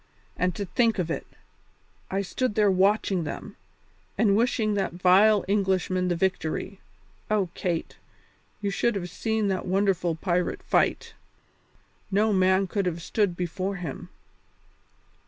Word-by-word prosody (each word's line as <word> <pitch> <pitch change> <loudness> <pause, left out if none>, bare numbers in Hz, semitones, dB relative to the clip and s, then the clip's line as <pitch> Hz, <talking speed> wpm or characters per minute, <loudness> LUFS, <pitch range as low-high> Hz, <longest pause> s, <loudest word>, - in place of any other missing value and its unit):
And 180 -1 0
to 200 - -3
think 230 +4 +1
of 170 -3 -1
it! - - -4 0.8
I 195 +1 -1
stood 230 +3 -2
there 210 -2 +4
watching 190 -1 +2
them, 150 - -6 0.6
and 205 -1 +3
wishing 225 -2 +1
that 195 -3 -1
vile 190 +4 +4
Englishman 190 -2 +1
the 175 - +1
victory. 190 +1 -2 0.5
Oh, 205 -4 +1
Kate! 170 -3 -3 0.6
you 200 -1 -1
should 235 +4 0
have 180 -3 -4
seen 220 +1 -1
that 190 -1 -2
wonderful 185 -3 +1
pirate 175 +1 -1
fight. - - +1 1.0
No 210 +2 +2
man 190 0 +3
could 195 0 -1
have 170 -1 -2
stood 200 -4 0
before 185 +3 -3
him." 175 -7 -6
190 Hz, 135 wpm, -26 LUFS, 180-205 Hz, 1.0 s, there